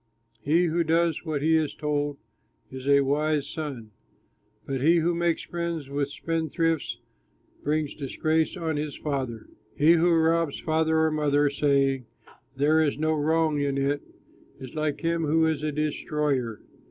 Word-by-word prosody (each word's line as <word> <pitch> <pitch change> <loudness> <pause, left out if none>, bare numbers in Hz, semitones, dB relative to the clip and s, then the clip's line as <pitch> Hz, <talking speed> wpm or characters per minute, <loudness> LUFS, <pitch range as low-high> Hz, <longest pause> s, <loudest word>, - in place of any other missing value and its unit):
He 160 +8 +3
who 170 0 +1
does 165 0 +1
what 150 -3 -2
he 160 +1 +4
is 155 -2 0
told 145 -1 -2 0.5
is 130 0 -7
a 140 0 +5
wise 145 +1 0
son. 140 -8 -6 0.7
But 135 -2 -3
he 165 +5 +5
who 170 +1 +2
makes 170 -1 0
friends 170 -4 -4
of 140 0 -1
spendthrifts, 160 -4 -1 0.7
Brings 150 0 0
disgrace 155 +5 -1
on 160 -3 -2
his 150 -1 -4
father. 130 -7 -4 0.3
He 150 +3 +5
who 170 +1 +4
robs 165 -2 +2
father 160 0 +1
or 160 0 +2
mother, 145 -1 +2
Saying, 135 -3 +1 0.5
"There 150 +3 +3
is 145 -3 +1
no 155 +1 +1
wrong 155 0 +1
in 140 -1 0
it," 140 +1 0 0.6
Is 130 -2 -9
like 155 -2 -2
him 165 -1 0
who 160 +2 +3
is 160 -2 0
a 155 0 -1
destroyer. 150 -5 -2
150 Hz, 155 wpm, -26 LUFS, 140-160 Hz, 0.7 s, a